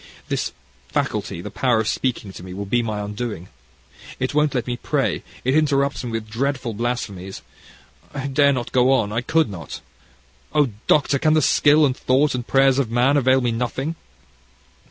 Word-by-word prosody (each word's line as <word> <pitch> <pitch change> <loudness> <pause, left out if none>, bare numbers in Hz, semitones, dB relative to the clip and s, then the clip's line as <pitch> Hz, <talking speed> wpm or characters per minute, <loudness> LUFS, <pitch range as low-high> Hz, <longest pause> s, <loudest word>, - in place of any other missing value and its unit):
"This - - -1 0.4
faculty, 85 +4 -2
the - - -7
power 125 -4 +1
of 110 - -1
speaking 115 -7 -2
to - - -10
me, 90 0 -8
will 100 +1 -4
be 120 +5 +1
my 110 -3 -3
undoing. 105 -3 -5 0.7
It 130 +2 -1
won't 150 -1 +2
let 120 -3 0
me 125 - -2
pray, - - -1 0.2
it 130 - +1
interrupts 140 -3 +1
me 120 - -4
with 115 -1 -4
dreadful 125 +1 -2
blasphemies. 100 -5 -4 0.7
I 135 -2 -5
dare 140 +1 +3
not 125 -3 -3
go 125 +1 +4
on, 110 -6 +1
I 115 +3 -1
could 160 +6 +2
not. 85 -6 -7 0.8
Oh! 145 -3 +4 0.2
Doctor, 140 -2 +3
can 155 +2 +3
the 155 - +4
skill, 150 +3 +5
and 130 -2 0
thought, 135 +4 +2
and 125 -2 -4
prayers 135 0 +4
of 130 -5 0
man 125 +4 +3
avail 130 -1 +4
me 120 -1 0
nothing!" 125 +6 -2
125 Hz, 180 wpm, -22 LUFS, 110-140 Hz, 0.8 s, skill